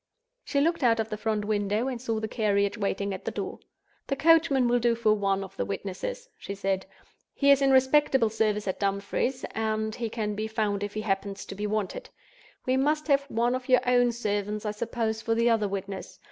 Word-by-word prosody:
She 280 Hz, -, 0 dB
looked 335 Hz, +2 st, +1 dB
out 230 Hz, -2 st, +4 dB
of 220 Hz, 0 st, -1 dB
the 215 Hz, -, -3 dB
front 215 Hz, -1 st, -1 dB
window, 210 Hz, +2 st, 0 dB
and 250 Hz, -3 st, -4 dB
saw 225 Hz, -3 st, -1 dB
the 220 Hz, -, -3 dB
carriage 200 Hz, -3 st, +1 dB
waiting 200 Hz, -2 st, -2 dB
at 190 Hz, -, -7 dB
the -, -, -2 dB
door. -, -, -5 dB, 0.5 s
"The 275 Hz, -, 0 dB
coachman 310 Hz, -4 st, +4 dB
will 245 Hz, 0 st, +3 dB
do 235 Hz, 0 st, +2 dB
for 220 Hz, -2 st, +3 dB
one 195 Hz, -2 st, 0 dB
of 195 Hz, 0 st, -10 dB
the -, -, 0 dB
witnesses," 200 Hz, -, -5 dB
she 200 Hz, -, -6 dB
said. 195 Hz, -1 st, -1 dB, 0.5 s
"He 280 Hz, 0 st, +4 dB
is 280 Hz, 0 st, +5 dB
in 275 Hz, -, +4 dB
respectable 265 Hz, -3 st, +4 dB
service 210 Hz, -2 st, 0 dB
at 190 Hz, -, -2 dB
Dumfries, 200 Hz, +6 st, -1 dB
and 220 Hz, 0 st, -1 dB
he 230 Hz, 0 st, -3 dB
can 215 Hz, -2 st, -2 dB
be 215 Hz, +1 st, -3 dB
found 215 Hz, -2 st, -1 dB
if 205 Hz, 0 st, -4 dB
he 215 Hz, -, -1 dB
happens 195 Hz, -1 st, -2 dB
to -, -, -7 dB
be 205 Hz, +2 st, -3 dB
wanted. 215 Hz, -, -3 dB, 0.6 s
We 255 Hz, +1 st, +2 dB
must 300 Hz, +3 st, +1 dB
have 280 Hz, 0 st, +3 dB
one 235 Hz, +2 st, +1 dB
of 255 Hz, 0 st, -4 dB
your 255 Hz, -1 st, +6 dB
own 245 Hz, -1 st, +4 dB
servants, 210 Hz, -2 st, -2 dB
I 210 Hz, -, 0 dB
suppose, 220 Hz, 0 st, -2 dB
for 225 Hz, 0 st, 0 dB
the 235 Hz, +1 st, +3 dB
other 215 Hz, -2 st, +2 dB
witness. 195 Hz, 0 st, -6 dB
220 Hz, 215 wpm, -27 LUFS, 205-250 Hz, 0.6 s, your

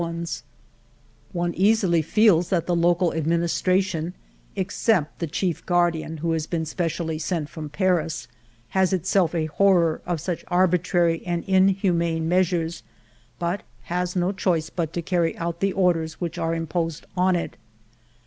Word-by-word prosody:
ALFRED 170 Hz, 0 st, -2 dB
DREYFUS 170 Hz, 0 st, -5 dB, 0.9 s
215 175 Hz, -, -3 dB
One 175 Hz, 0 st, 0 dB, 0.2 s
easily 185 Hz, -7 st, +2 dB
feels 180 Hz, 0 st, +3 dB
that 175 Hz, -4 st, +1 dB
the 175 Hz, -, +1 dB
local 175 Hz, +1 st, +2 dB
administration 170 Hz, +2 st, 0 dB, 0.4 s
(except 190 Hz, -3 st, 0 dB
the 170 Hz, -, -2 dB
chief 175 Hz, +2 st, -2 dB
guardian 170 Hz, -2 st, +1 dB
who 165 Hz, +2 st, -1 dB
has 160 Hz, -1 st, -1 dB
been 165 Hz, -2 st, -2 dB
specially 165 Hz, -1 st, -2 dB
sent 160 Hz, -2 st, -2 dB
from 155 Hz, -2 st, -7 dB
Paris) 165 Hz, -1 st, 0 dB, 0.4 s
has 190 Hz, 0 st, +2 dB
itself 180 Hz, -1 st, +1 dB
a 160 Hz, -2 st, +1 dB
horror 170 Hz, -1 st, +3 dB
of 175 Hz, -2 st, -1 dB
such 175 Hz, +2 st, -4 dB
arbi 180 Hz, 0 st, +3 dB
trary 170 Hz, -1 st, +1 dB
and 175 Hz, -1 st, -2 dB
inhumane 185 Hz, -4 st, +2 dB
measures, 170 Hz, -2 st, +1 dB, 0.6 s
but 175 Hz, +3 st, -2 dB, 0.2 s
has 180 Hz, +1 st, -2 dB
no 180 Hz, +1 st, +1 dB
choice 175 Hz, -5 st, 0 dB
but 165 Hz, -3 st, -2 dB
to 170 Hz, -, -3 dB
ca^ry 170 Hz, 0 st, 0 dB
out 170 Hz, -2 st, -3 dB
the 195 Hz, +1 st, +1 dB
orders 170 Hz, -4 st, +1 dB
which 170 Hz, -2 st, -4 dB
are 165 Hz, 0 st, 0 dB
imposed 165 Hz, -1 st, -3 dB
on 185 Hz, 0 st, +3 dB
it. 170 Hz, -, -3 dB
170 Hz, 155 wpm, -24 LUFS, 165-185 Hz, 0.9 s, feels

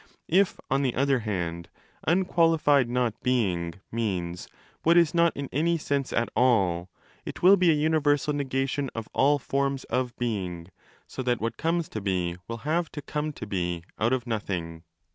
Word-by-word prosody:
If, 195 Hz, +1 st, +3 dB
on 135 Hz, +1 st, +1 dB
the 130 Hz, -3 st, 0 dB
other 135 Hz, 0 st, +2 dB
hand, 85 Hz, -6 st, -3 dB, 0.2 s
' -, -, -25 dB
unqualified 165 Hz, -6 st, +3 dB
not 120 Hz, -2 st, -1 dB
being' 90 Hz, -10 st, 0 dB, 0.2 s
means 90 Hz, -7 st, -3 dB, 0.2 s
' -, -, -32 dB
what 170 Hz, +2 st, +4 dB
is 170 Hz, -3 st, +4 dB
not 170 Hz, -1 st, +4 dB
in 140 Hz, -1 st, -3 dB
any 165 Hz, +5 st, +1 dB
sense 140 Hz, -3 st, -2 dB
at 115 Hz, -, +1 dB
all', 95 Hz, -8 st, +2 dB, 0.3 s
it -, -, -8 dB
will 190 Hz, +2 st, +8 dB
be 180 Hz, -3 st, +3 dB
a 160 Hz, -, +5 dB
universal 150 Hz, -1 st, +2 dB
negation 135 Hz, 0 st, -1 dB
of 115 Hz, -1 st, -5 dB
all 145 Hz, +2 st, +4 dB
forms 140 Hz, 0 st, -1 dB
of 125 Hz, -1 st, -1 dB
being, 95 Hz, -8 st, -3 dB, 0.4 s
so -, -, -6 dB
that 125 Hz, -2 st, 0 dB
what 115 Hz, +1 st, -2 dB
comes 165 Hz, 0 st, 0 dB
to 110 Hz, -, -5 dB
be 90 Hz, -3 st, -1 dB
will 115 Hz, 0 st, -6 dB
have 165 Hz, +2 st, 0 dB
to 145 Hz, -, -5 dB
come 150 Hz, 0 st, -3 dB
to 110 Hz, -, -7 dB
be 90 Hz, -4 st, -2 dB, 0.2 s
out 115 Hz, +3 st, +2 dB
of 130 Hz, -2 st, 0 dB
nothing. 90 Hz, -8 st, -3 dB
130 Hz, 180 wpm, -27 LUFS, 100-150 Hz, 0.4 s, will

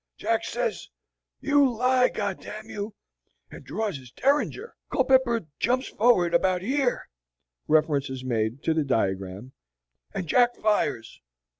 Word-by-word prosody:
Jack -, -, 0 dB
says, -, -, -3 dB, 0.5 s
'You 285 Hz, -2 st, +4 dB
lie, 250 Hz, +1 st, +4 dB
G -, -, -15 dB
d 205 Hz, -2 st, 0 dB, 0.2 s
d -, -, -6 dB
mn 220 Hz, -, -18 dB
you,' 205 Hz, +1 st, -5 dB, 0.6 s
and -, -, -11 dB
draws 215 Hz, -7 st, -3 dB
his 130 Hz, -2 st, -13 dB
derringer. 295 Hz, -, 0 dB, 0.2 s
Culpepper 260 Hz, -3 st, +3 dB, 0.2 s
jumps 255 Hz, +3 st, 0 dB
forward 195 Hz, -7 st, +3 dB
about 180 Hz, +1 st, +2 dB
here" 265 Hz, +2 st, 0 dB, 0.6 s
(reference 150 Hz, -3 st, +2 dB
is 130 Hz, -1 st, -6 dB
made 115 Hz, +1 st, -2 dB
to 160 Hz, -, +2 dB
the 160 Hz, -1 st, +1 dB
diagram) 100 Hz, -2 st, -2 dB, 0.6 s
"and 195 Hz, -2 st, -4 dB
Jack 245 Hz, +7 st, +3 dB
fires. 210 Hz, -, -1 dB
195 Hz, 140 wpm, -26 LUFS, -, 0.6 s, You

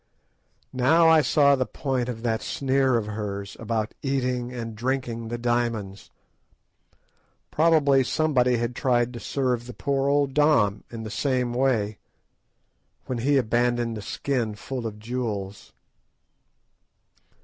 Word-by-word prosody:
Now 160 Hz, +6 st, +4 dB
I 160 Hz, -1 st, +6 dB
saw 140 Hz, -2 st, +4 dB
the 130 Hz, -2 st, -1 dB
point 130 Hz, -3 st, -2 dB
of 115 Hz, -2 st, -6 dB
that 110 Hz, -2 st, 0 dB
sneer 135 Hz, -2 st, +1 dB
of 110 Hz, -, -2 dB
hers 100 Hz, -2 st, -5 dB
about 110 Hz, -1 st, -2 dB
eating 125 Hz, -3 st, -1 dB
and 115 Hz, -3 st, -6 dB
drinking 120 Hz, -1 st, -2 dB
the 120 Hz, +1 st, -4 dB
diamonds. 115 Hz, -4 st, -2 dB, 1.4 s
Probably 150 Hz, -4 st, +4 dB
somebody 125 Hz, -3 st, +2 dB
had 120 Hz, +1 st, -2 dB
tried 125 Hz, -2 st, +1 dB
to 120 Hz, -, -6 dB
serve 125 Hz, -2 st, -1 dB
the 125 Hz, -, -9 dB
poor 140 Hz, -1 st, 0 dB
old 140 Hz, -1 st, +2 dB
Dom 145 Hz, -9 st, +3 dB
in 115 Hz, -1 st, -7 dB
the 110 Hz, -, -6 dB
same 125 Hz, -1 st, 0 dB
way, 120 Hz, -5 st, 0 dB, 1.1 s
when 125 Hz, -2 st, -3 dB
he 140 Hz, +4 st, +2 dB
abandoned 120 Hz, -1 st, +1 dB
the 105 Hz, -, -6 dB
skin 115 Hz, 0 st, -2 dB
full 125 Hz, +2 st, -5 dB
of 105 Hz, -1 st, -7 dB
jewels. 105 Hz, -4 st, -5 dB
125 Hz, 130 wpm, -25 LUFS, 115-135 Hz, 1.4 s, I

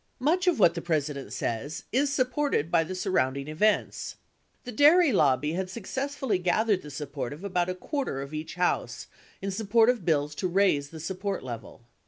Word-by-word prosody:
Much 345 Hz, +8 st, +1 dB
of 355 Hz, -, +4 dB
what 170 Hz, -5 st, +5 dB
the 170 Hz, -, -4 dB
President 150 Hz, -4 st, -2 dB
says 120 Hz, +7 st, -3 dB
is 275 Hz, +4 st, +2 dB
supported 255 Hz, -, 0 dB
by 165 Hz, -2 st, +4 dB
the 185 Hz, +3 st, -6 dB
surrounding 140 Hz, -8 st, 0 dB
events. 200 Hz, +8 st, 0 dB, 0.5 s
The 250 Hz, -, -6 dB
dairy 300 Hz, +6 st, +6 dB
lobbly 145 Hz, -4 st, +3 dB
had 185 Hz, +1 st, -2 dB
successfully 260 Hz, +1 st, -2 dB
gathered 190 Hz, +2 st, +1 dB
the 150 Hz, -, -10 dB
support 140 Hz, -3 st, -5 dB
of 155 Hz, +6 st, -11 dB
about 180 Hz, -3 st, 0 dB
a 185 Hz, -, -2 dB
quarter 270 Hz, -, -3 dB
of 140 Hz, +2 st, -7 dB
each 155 Hz, +2 st, -5 dB
House 180 Hz, 0 st, -1 dB, 0.4 s
in 195 Hz, -, -2 dB
support 225 Hz, +3 st, +3 dB
of 240 Hz, -6 st, -6 dB
bills 150 Hz, -3 st, +1 dB
to 185 Hz, -, +1 dB
raise 175 Hz, -6 st, +2 dB
the 160 Hz, -, -9 dB
support 190 Hz, +4 st, -3 dB
level. 120 Hz, -1 st, -8 dB
185 Hz, 180 wpm, -27 LUFS, 150-230 Hz, 0.5 s, dairy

